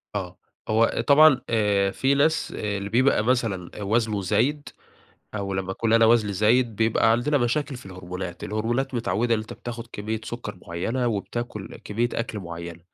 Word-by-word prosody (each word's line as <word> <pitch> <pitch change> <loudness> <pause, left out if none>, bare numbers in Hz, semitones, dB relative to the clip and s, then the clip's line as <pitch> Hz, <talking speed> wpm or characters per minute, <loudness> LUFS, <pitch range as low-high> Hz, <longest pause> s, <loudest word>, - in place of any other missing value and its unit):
آه. 95 -2 -4 0.3
هو 115 +1 +2
طبعًا 145 -2 +7
آآ 105 -3 +2
في 135 +7 +1
ناس، 155 +3 +2
آآ، 105 -1 -2
اللي 100 0 -5
بيبقى 125 0 +3
مثلًا 110 -6 -1
وزنه 110 0 0
زايد، 120 +10 0 0.7
أو 100 -2 -3
لمّا 95 0 -2
اكون 110 +3 -1
أنا 115 0 +6
وزني 110 -3 +3
زايد، 110 +3 +2
بيبقى 115 0 +3
عندنا 140 +6 +2
مشاكل 135 +3 -1
في 120 - -12
الهرمونات. 90 -1 -7
الهرمونات 120 +5 -1
متعوّدة 120 0 +1
إن - - 0
أنت 110 - -8
بتاخد 120 -1 -7
كميّة 110 +2 -3
سكر 115 -4 -6
معيّنة، 115 +9 -2
وبتاكل 110 -1 -4
كميّة 115 +4 0
أكل 115 -2 -3
معيّنة، 85 -2 -7
110 Hz, 160 wpm, -25 LUFS, 100-120 Hz, 0.7 s, طبعًا